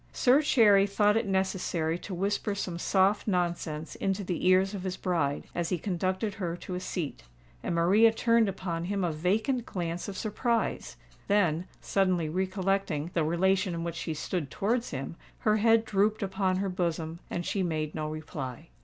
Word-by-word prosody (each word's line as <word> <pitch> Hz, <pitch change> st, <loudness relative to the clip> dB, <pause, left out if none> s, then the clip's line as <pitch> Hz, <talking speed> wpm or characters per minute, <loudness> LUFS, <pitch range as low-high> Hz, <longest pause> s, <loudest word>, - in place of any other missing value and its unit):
Sir 260 Hz, +4 st, +4 dB
Cherry 210 Hz, -9 st, +5 dB
thought 205 Hz, +1 st, +3 dB
it 225 Hz, -1 st, +1 dB
necessary 185 Hz, -4 st, 0 dB
to 190 Hz, -, -6 dB
whisper 200 Hz, +3 st, -1 dB
some 180 Hz, -4 st, -4 dB
soft 195 Hz, +4 st, +2 dB
nonsense 170 Hz, -4 st, -1 dB
in 195 Hz, -, 0 dB
the 185 Hz, -2 st, -2 dB
ears 190 Hz, +2 st, +4 dB
of 200 Hz, -, -4 dB
his 185 Hz, 0 st, -3 dB
bride, 160 Hz, -6 st, 0 dB
as 170 Hz, -1 st, -1 dB
he 180 Hz, -, 0 dB
conducted 185 Hz, +3 st, -1 dB
her 175 Hz, -4 st, -3 dB
to 185 Hz, -, -7 dB
a 180 Hz, -, -2 dB
seat; 175 Hz, -4 st, -4 dB, 0.4 s
and -, -, -2 dB
Maria 200 Hz, +7 st, +5 dB
turned 230 Hz, -1 st, +3 dB
upon 175 Hz, -3 st, -3 dB
him 195 Hz, +1 st, -1 dB
a 175 Hz, -, +1 dB
vacant 215 Hz, -, 0 dB
glance 175 Hz, -1 st, -3 dB
of 195 Hz, -2 st, -6 dB
surprise;—then, 205 Hz, -5 st, -1 dB
suddenly 185 Hz, -5 st, +1 dB
recollecting 185 Hz, -3 st, -1 dB
the 165 Hz, -, +1 dB
relation 185 Hz, +3 st, +1 dB
in 165 Hz, -, -3 dB
which 170 Hz, 0 st, -3 dB
she 160 Hz, -1 st, -4 dB
stood 155 Hz, -1 st, -3 dB
towards 230 Hz, -, -1 dB
him, 135 Hz, +3 st, -5 dB, 0.2 s
her 215 Hz, 0 st, +3 dB
head 225 Hz, +1 st, +4 dB
drooped 210 Hz, +2 st, +1 dB
upon 190 Hz, -1 st, 0 dB
her 195 Hz, +1 st, -1 dB
bosom, 170 Hz, -3 st, -2 dB
and 175 Hz, -, -3 dB
she 200 Hz, -, -1 dB
made 155 Hz, -4 st, -1 dB
no 155 Hz, -1 st, -3 dB
reply. 150 Hz, -5 st, -6 dB
185 Hz, 170 wpm, -29 LUFS, 170-200 Hz, 0.4 s, Cherry